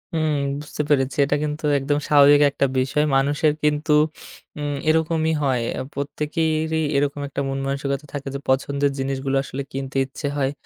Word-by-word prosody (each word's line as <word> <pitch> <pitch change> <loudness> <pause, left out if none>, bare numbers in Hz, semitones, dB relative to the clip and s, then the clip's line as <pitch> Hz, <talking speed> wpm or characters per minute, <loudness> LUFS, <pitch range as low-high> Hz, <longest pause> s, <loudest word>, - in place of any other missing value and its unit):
উম 155 -2 +1 0.3
বুঝতে 150 0 -5
পেরেছি। 135 -1 +1
এটা 145 - +1
কিন্তু 150 +1 -3
একদম 145 +2 0
স্বাভাবিক 145 0 +6
একটা 140 - +1
বিষয়। 140 +4 +1
মানুষের 145 +3 +2
কিন্তু 150 0 +2 0.7
উম 145 -1 -2
এরকমই 160 0 +2
হয়। 130 -4 +1 0.2
আ - - -2
প্রত্যেকেরই 155 +2 -1
এরকম 145 0 0
একটা 140 - -4
মনমানসিকতা 135 +1 -2 0.2
থাকে 140 -1 -5
যে 140 - -3
পছন্দের 140 +1 +1
জিনিসগুলো 135 0 -2
আসলে 135 +1 -5
কিনতে 135 0 -4
ইচ্ছে 140 +2 -6
হয়। 135 -1 +1
145 Hz, 150 wpm, -22 LUFS, 135-150 Hz, 0.7 s, স্বাভাবিক